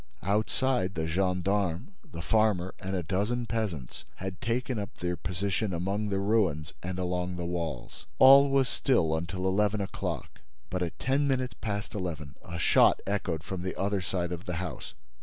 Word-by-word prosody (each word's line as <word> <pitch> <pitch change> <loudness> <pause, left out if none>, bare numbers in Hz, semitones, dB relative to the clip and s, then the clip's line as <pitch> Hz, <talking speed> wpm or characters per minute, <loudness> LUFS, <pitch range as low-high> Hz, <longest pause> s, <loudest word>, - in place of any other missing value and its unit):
Outside, 105 0 +1
the 80 -1 -1
gendarmes, 90 - 0 0.2
the 85 -1 -6
farmer 105 -5 +2
and 95 +1 -3
a 90 - -1
dozen 105 +8 0
peasants 100 - -3
had 95 -2 -6
taken 120 0 -1
up 100 - -6
their 90 0 -1
position 95 +4 -2
among 100 +5 -1
the 100 - 0
ruins 95 -7 +1
and 90 +1 -4
along 90 0 -1
the 90 -1 -4
walls. 85 -1 -4
All 140 +1 +9
was 135 -1 +3
still 85 -16 +2
until 85 +3 -3
eleven 105 +2 +2
o'clock; 100 -1 -4 0.3
but, 90 - -1
at 85 -2 -2
ten 140 +2 +1
minutes 130 -2 0
past 105 0 -3
eleven, 80 -8 -4
a 85 -1 -6
shot - - +5
echoed 90 -5 -1
from 95 -1 -5
the 95 +1 -3
other 100 0 0
side 90 -1 -2
of 90 +2 -5
the 90 - -3
house. 85 -6 -5
95 Hz, 170 wpm, -29 LUFS, 90-105 Hz, 0.3 s, All